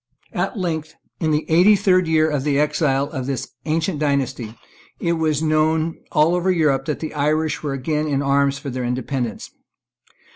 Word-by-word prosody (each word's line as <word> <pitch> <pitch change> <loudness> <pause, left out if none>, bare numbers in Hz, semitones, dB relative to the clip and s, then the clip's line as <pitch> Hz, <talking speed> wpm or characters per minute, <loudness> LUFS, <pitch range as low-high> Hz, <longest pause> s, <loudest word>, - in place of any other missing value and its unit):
At - - -2
length, 160 -4 -3 0.2
in 160 - 0
the 150 0 +1
eighty 180 +6 +6
third 185 -3 +3
year 160 -1 +3
of 145 -4 -1
the 145 -1 +1
exile 145 -2 +1
of 130 -1 -4
this 135 -2 -3 0.2
ancient 160 +1 -1
dynasty, 135 -6 -1 0.4
it 170 -1 0
was 160 -2 0
known 155 +1 +1
over 165 +4 +3
all - - +5
Europe 150 -6 +2
that 150 -2 -3
the 160 - -4
Irish 150 +1 0
were 145 -3 -3
again 150 +3 -1
in 140 -1 0
arms 140 0 +2
for 140 -1 -6
their 125 0 -3
independence. 125 -1 -3
150 Hz, 175 wpm, -21 LUFS, 140-160 Hz, 0.4 s, eighty